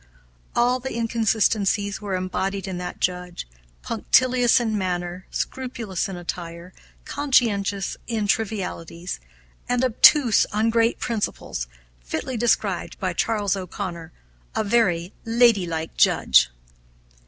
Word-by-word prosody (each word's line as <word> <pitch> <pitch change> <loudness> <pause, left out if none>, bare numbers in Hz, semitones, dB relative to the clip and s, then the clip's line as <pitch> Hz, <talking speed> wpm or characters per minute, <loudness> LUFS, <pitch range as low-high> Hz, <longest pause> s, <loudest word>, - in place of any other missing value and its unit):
All 245 +1 +3
the 265 -1 -5
inconsistencies 220 -3 +1
were 200 -2 -2
embodied 190 +2 -2
in 185 -2 -4
that 180 0 -6
Judge, 180 - -2 0.4
punctilious 250 - +3
in 225 -3 -1
manner, 180 -2 -3
scrupulous 230 -7 -3
in 190 - -6
attire, 170 0 -7 0.3
conscientious 205 -8 +1
in 225 -3 -1
trivialities, 190 -5 -3 0.5
and 245 +1 +1
obtuse 255 0 +5
on 220 +2 +1
great 230 0 +2
principles, 205 - -3 0.4
fitly 245 - -4
described 235 0 0
by - - -1
Charles 205 -4 0
O'Conor 180 -3 -6 0.4
"A - - +1
very 195 -5 +1
ladylike 205 -9 +2
Judge." - - +5
205 Hz, 110 wpm, -23 LUFS, 180-230 Hz, 0.5 s, obtuse